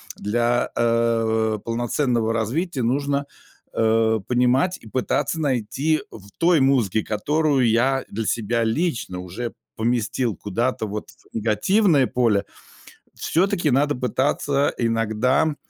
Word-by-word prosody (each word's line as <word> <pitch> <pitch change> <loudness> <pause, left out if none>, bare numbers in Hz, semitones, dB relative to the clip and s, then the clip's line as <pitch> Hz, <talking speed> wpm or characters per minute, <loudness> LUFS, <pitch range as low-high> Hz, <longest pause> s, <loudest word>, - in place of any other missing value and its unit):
для, 120 +3 0
э, 115 -2 +1
полноценного 120 0 0
развития 130 - -1
нужно, 140 +3 0 0.5
э, 110 0 +2
понимать 125 +8 +2
и 110 - -14
пытаться 130 +6 -1
найти 140 +3 0
в 100 -2 -12
той 170 -1 +4
музыке, 120 -6 +2
которую 140 +3 +1
я 130 +4 +2
для 110 +2 -4
себя 115 +2 0
лично 115 - -1
уже 95 +7 -6 0.2
поместил 115 -1 -1
куда-то 110 +4 -2
вот 105 +1 -6
в - - -23
негативное 135 - +2
поле, 115 -5 +1 0.7
все-таки 175 -2 +1
надо 145 +3 +2
пытаться 140 +2 0
иногда, 115 +6 +1
120 Hz, 110 wpm, -22 LUFS, 110-140 Hz, 0.7 s, той